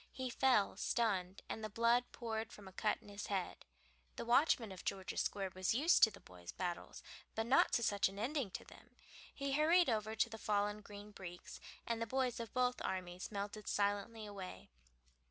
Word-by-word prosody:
He 260 -1 -4
fell 250 -6 +3
stunned, 195 -5 0
and 220 - -5
the 215 - -2
blood 235 +3 +3
poured 225 -2 -4
from 205 -2 -11
a - - -9
cut 210 +2 +1
in - - -15
his 205 0 -6
head. 195 -3 -3 0.5
The - - -4
watchman 240 -3 +4
in 190 - -8
George's 190 -1 -2
Square 195 -2 -2
was 185 +3 +1
used 310 +8 +5
to 220 - +9
the - - -13
boys' 90 -1 -10
battles, 175 -2 -4 0.3
but 225 - 0
not 260 +4 +5
to 235 - +3
such 200 -3 +3
an 195 - -11
ending 255 +1 -1
to - - -7
them. - - -16 0.4
He 280 0 -3
hurried 320 +3 +5
over 220 0 -1
to 220 - +3
the 225 -1 -8
fallen 205 0 0
Green 205 0 -10
Breeks, 175 -3 -9 0.3
and 230 -1 -1
the 230 - -1
boys 255 0 0
of 230 -3 -5
both 250 0 +1
armies 180 0 -3
melted 205 +1 -4
silently 205 +2 0
away. 190 - -8
215 Hz, 190 wpm, -38 LUFS, 195-235 Hz, 0.5 s, to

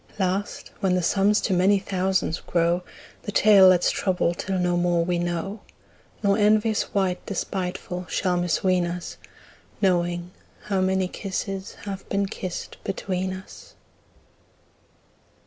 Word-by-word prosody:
Last 195 +1 -2
when 185 -2 +2
the 180 - 0
sums 205 +4 +3
to 195 - 0
many 190 +3 +4
thousands 190 -3 -1
grow, 170 0 +1
10 - - -19 0.4
The - - -5
tale 205 -2 +7
let's 180 -1 +5
trouble 180 -2 0
till 190 +2 -3
no 180 -1 +1
more 175 -1 +2
we 175 0 0
know, 175 +4 -3 0.6
Nor 200 +1 +3
envious 215 +1 +2
wight 190 -3 0
despiteful 180 -2 -4
shall 180 -1 0
misween 175 +1 +1
us 175 0 -6 0.6
Knowing 175 -2 +1 0.3
how 195 -2 0
many 190 0 +1
kisses 195 0 -5
have 195 -2 -6
been 200 0 +1
kissed 185 -2 -6
between 190 -1 -2
us. 185 0 -10
185 Hz, 130 wpm, -24 LUFS, 180-195 Hz, 0.6 s, tale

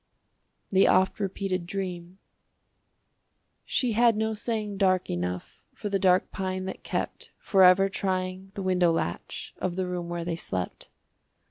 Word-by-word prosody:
THE 195 0 +5
OFT 190 +3 +3
REPEATED 190 -2 -2
DREAM 180 -2 -5 1.5
She 250 -3 +1
had 230 0 +4
no 220 0 0
saying 215 -2 -3
dark 185 -2 +2
enough 90 0 -4
For 205 - -4
the 195 -1 +1
dark 185 0 +3
pine 185 -1 -3
that 190 - -6
kept - - -3
Forever 190 -1 +5
trying 185 0 -2
the 195 - -4
window 180 -2 +3
latch 85 - -3
Of 180 -2 -2
the 185 0 -1
room 180 -1 -4
where 170 -1 -3
they 170 -1 -1
slept. 95 - -4
185 Hz, 140 wpm, -27 LUFS, 180-195 Hz, 1.5 s, THE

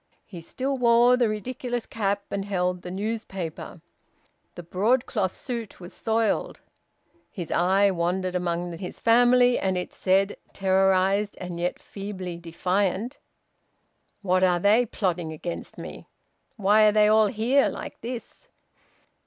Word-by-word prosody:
He 180 -5 -10
still 265 +10 -3
wore 240 +1 +5
the 245 -3 +2
ridiculous 240 +2 -4
cap 200 -2 -2
and 200 -1 -2
held 180 -2 -1
the 180 - -7
newspaper. 195 -4 -5 0.7
The 175 - -8
broadcloth 205 +2 0
suit 235 -2 -6
was 175 0 -10
soiled. 225 -1 -1 0.7
His 175 -5 -6
eye 190 +3 +3
wandered 180 +1 -1
among 175 -1 -2
his 180 -2 -7
family, 245 +1 +4
and 190 -1 0
it 180 - -4
said, 195 +2 +1 0.2
terrorised, 195 +1 +2
and 175 -1 -6
yet 175 +1 -1
feebly 190 -4 -7
defiant, 190 - -1 1.0
"What 185 -1 +2
are 180 -1 +3
they 215 +6 +4
plotting 175 -7 -2
against 170 +2 -7
me? - - -9 0.5
Why 210 +1 +5
are - - +5
they 210 0 +4
all 215 0 +5
here 245 +6 +2
like - - -8
this?" 245 - -8
195 Hz, 130 wpm, -25 LUFS, 180-225 Hz, 1.0 s, wore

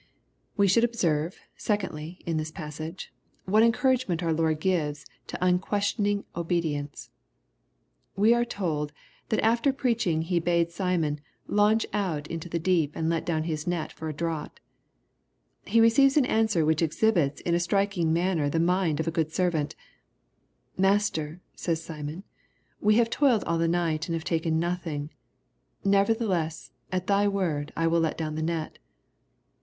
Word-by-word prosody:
We 200 -1 +4
should 210 +5 +4
observe, 170 -8 0 0.2
secondly, 180 -5 -3
in 165 -3 -1
this 155 0 -2
passage, 155 +1 -7 0.3
what 210 +4 +4
encouragement 230 -6 +2
our 165 -1 +1
Lord 160 -1 +1
gives 150 -5 -1 0.2
to - - -5
unquestioning 200 +2 +1
obedi 170 -2 0
ence. 145 0 -7 1.0
We 215 +4 +5
are 240 0 +2
told, 160 -10 -3 0.4
that 220 - +1
after 235 +5 +3
preaching 230 - 0
He 175 +1 0
bade 170 0 +1
Simon 170 -5 -1 0.2
*' - - -46
launch 210 +2 +3
out 170 -8 -1
into 165 +1 -5
the 170 - -1
deep 165 -3 +1
and 160 0 -1
let 165 - -2
down 160 -2 0
his 155 -1 -3
net 175 -2 -2
for 160 - -6
a - - -4
draught/^ 165 -2 -3 1.1
He 230 +4 +3
receives 270 +5 +5
an 280 - +5
answer 220 -9 +2
which 155 +1 +2
exhibits 165 -2 +2
in 170 - -1
a 170 - +3
striking 195 -2 +1
manner 170 -3 +1
the 165 - 0
mind 170 -2 +1
of 160 - -1
a - - +1
good 160 -2 -1
servant 165 -5 0 0.5
" - - -43
Master," 175 -5 0
says 165 -2 -2
Simon, 155 +3 -6 0.6
we 210 +1 +3
have 230 0 +3
toiled 260 -7 +3
all 165 0 -1
the 165 - +2
night 165 -2 0
and 165 - -1
have 165 - -4
taken 160 -1 0
nothing: 165 -4 -3 0.7
nevertheless, 195 -5 +1 0.2
at 185 -1 -1
thy 200 +1 +3
word 170 -8 -1
I 165 - +1
will 165 +1 +3
let 165 -1 0
down 155 -2 -3
the 155 - -3
net." 160 -1 -3
170 Hz, 160 wpm, -27 LUFS, 160-200 Hz, 1.1 s, We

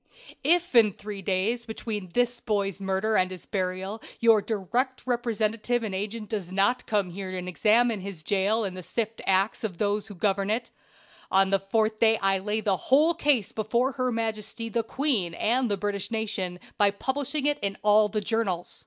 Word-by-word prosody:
"If 345 +3 +2
in 230 -3 +7
the 205 - -7
three 205 -1 -7
days 195 +6 0
between 220 -4 -5
this 245 0 +1
boy's 200 -4 -1
murder 195 +3 0
and 185 -2 +3
his 185 -1 -9
burial 190 +2 -3 0.2
your 225 -2 +5
direct 235 +6 -2
representative 235 -1 0
and 210 -3 -3
agent 210 +3 -4
does 195 -4 -4
not 200 +6 +1
come 200 -4 0
here 190 +1 -6
and 180 0 -5
examine 215 +3 +2
this 190 -5 -7
jail 205 +5 +1
and 185 -2 -5
sift 225 +4 -3
the - - -6
acts 195 +4 +2
of 195 -6 -3
those 205 0 0
who 205 - -9
govern 195 +2 0
it, 225 +3 -1 0.6
on 195 0 +3
the 195 - +3
fourth 215 +2 0
day 225 -1 +5
I 195 -1 +1
lay 210 +3 -2
the 200 -3 +1
whole 300 - +4
case 285 - +1
before 235 +5 0
her 255 -1 -1
majesty 225 0 -3
the 230 +1 0
queen 225 - 0
and 245 +2 +1
the 205 - 0
British 200 0 -3
nation, 205 -5 -2 0.2
by 205 -1 +6
publishing 270 +7 -2
it 290 0 +1
in 200 -1 -2
all 210 0 +5
the 210 0 -1
journals. 205 -5 -2
215 Hz, 190 wpm, -27 LUFS, 195-230 Hz, 0.6 s, in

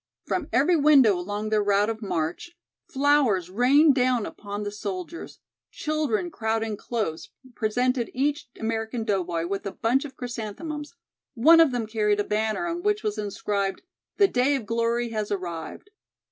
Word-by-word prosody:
From 335 -5 -2
every 295 +8 +3
window 285 -8 +6
along 205 +4 -4
their 215 -1 +2
route 205 0 +2
of 220 0 -7
march 175 - -3 0.3
flowers 270 - +2
rained 275 +8 +5
down 250 -4 +1
upon 205 0 -6
the 205 - -4
soldiers, 205 - -6 0.3
children 310 0 -2
crowding 220 -3 -1
close 205 -8 -4 0.2
presented 245 +2 0
each 280 +1 -1
American 225 +1 -2
doughboy 180 -6 -1
with 195 +3 -3
a - - -3
bunch 245 +7 +1
of 285 -3 -9
chrysanthemums; 255 +7 -6 0.4
one 320 +8 +7
of 325 -4 +6
them 240 -2 -2
carried 210 -1 0
a - - +2
banner 215 +9 -1
on 345 0 -3
which 420 +2 0
was 210 +1 -2
inscribed, 200 -1 -2 0.3
"The 400 - +6
Day 265 -1 +2
of 255 -5 -4
Glory 230 +1 0
has 215 -2 -2
Arrived." 180 - -5
225 Hz, 155 wpm, -25 LUFS, 205-280 Hz, 0.4 s, one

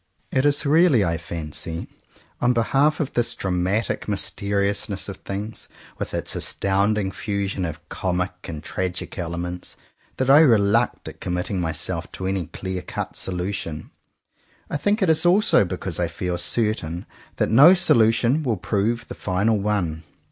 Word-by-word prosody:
'' - - -41
It 130 +1 +2
is 145 +1 +2
really, 150 - +5
I 85 -1 -1
fancy, 80 0 -5 0.5
on 120 +1 +3
behalf 135 +6 +2
of 145 -4 -2
this 120 -1 0
dramatic 95 +4 -1
mysteriousness 100 0 -1
of 100 -2 -6
things, 105 +3 -6 0.3
with - - -4
its - - -2
astounding 100 +1 0
fusion 100 -2 -2
of 80 -2 -7
comic 90 0 -1
and 80 -2 -6
tragic 90 +1 -4
elements, 90 +1 -4 0.4
that 130 - 0
I 140 +3 +8
reluct 115 -4 +3
at - - -10
committing 90 +1 -2
my 80 -2 -1
self - - -3
to 95 - -5
any 95 -3 -1
clear 95 +2 -5
cut - - -5
solution. 90 -4 -3 0.8
I - - 0
think 205 +7 +1
it 185 - +2
is 160 0 +3
also 175 - +4
because - - -4
I - - +1
feel 90 -1 -3
certain 95 -7 0 0.3
that - - 0
no 145 +10 +9
solu 120 -12 +5
tion 120 +6 +1
will 120 -8 0
prove 110 +6 -1
the - - -6
final 105 +3 0
one. 95 -6 -1
100 Hz, 155 wpm, -23 LUFS, 90-120 Hz, 0.8 s, no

